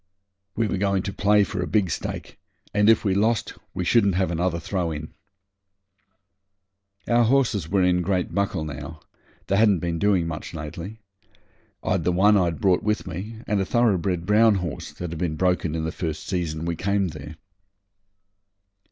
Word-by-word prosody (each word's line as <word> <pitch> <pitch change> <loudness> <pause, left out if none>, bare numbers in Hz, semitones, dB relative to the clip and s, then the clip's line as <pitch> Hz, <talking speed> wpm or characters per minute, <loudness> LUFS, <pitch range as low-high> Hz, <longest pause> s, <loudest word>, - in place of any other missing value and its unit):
We 115 - +1
were 95 - -2
going 100 -1 +1
to 100 - -4
play 105 0 +4
for 100 -2 -3
a 90 - -2
big 100 -6 +1
stake, - - -5 0.3
and 105 +1 +4
if 115 - +4
we 95 - +2
lost 110 +3 +1 0.2
we 90 - -2
shouldn't 100 -3 +3
have 95 -2 +1
another 85 0 0
throw 90 -1 -2
in. 75 0 -6 1.9
Our 120 0 +4
horses 115 - +1
were 95 0 +2
in 90 0 +3
great 90 0 -1
buckle 100 -6 -1
now; 75 +1 -7 0.4
they 100 - +1
hadn't 105 -3 +5
been 85 0 -3
doing 100 -3 +2
much 85 +1 -6
lately. 85 +7 -7 0.9
I - - -1
had - - +1
the 90 - +2
one 100 +4 +4
I'd 85 -3 +1
brought 95 -5 +3
with 105 +1 -1
me, 100 +5 -7
and 105 -2 0
a - - +2
thoroughbred 95 -6 +1
brown 105 +2 +5
horse 90 -5 -4
that 90 -2 -6
had 85 - -6
been 80 -3 -1
broken 90 -2 0
in 80 -1 -2
the 80 - -2
first 80 -3 -4
season 85 -4 -2
we 85 0 -1
came 100 +2 0
there. 75 0 -9
90 Hz, 180 wpm, -24 LUFS, 85-100 Hz, 1.9 s, hadn't